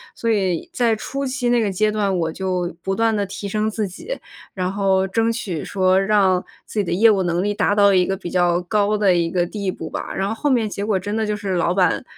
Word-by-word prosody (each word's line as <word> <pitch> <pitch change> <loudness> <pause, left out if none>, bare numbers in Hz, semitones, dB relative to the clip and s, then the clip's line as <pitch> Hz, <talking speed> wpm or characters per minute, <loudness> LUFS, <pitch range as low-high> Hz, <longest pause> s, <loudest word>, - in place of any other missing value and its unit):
所 230 - -1
以 190 -6 0
在 235 -2 +2
初 275 +6 -4
期 255 -2 -1
那 240 -1 +3
个 205 - 0
阶 215 +3 +1
段， 205 -3 0
我 165 -2 -1
就 180 -1 -2
不 195 +2 -2
断 225 0 +2
地 205 - 0
提 200 +1 -6
升 215 +2 0
自 215 -1 -2
己， - - -7 0.4
然 185 -1 -1
后 195 -1 +2
争 225 +4 +1
取 190 -9 -4
说 190 -1 +2
让 195 -3 +3 0.2
自 215 - -4
己 - - +2
的 180 - -4
业 215 +5 +5
务 195 - +2
能 175 0 0
力 205 +1 0
达 205 0 +1
到 200 -1 +5
一 185 -1 +4
个 195 - -1
比 180 -2 -7
较 175 -1 +2
高 210 +3 +1
的 200 -3 +3
一 170 -1 +1
个 175 0 +1
地 195 +1 -3
步 160 - -7
吧。 - - -5
然 190 +1 -1
后 210 - -2
后 290 +6 -1
面 235 -4 +2
结 200 -1 -4
果 205 -2 +1
真 205 +3 -4
的 220 - 0
就 210 - -1
是 200 -2 -3
老 175 -1 +1
板 180 +4 +2
200 Hz, 275 characters per minute, -21 LUFS, 185-215 Hz, 0.4 s, 业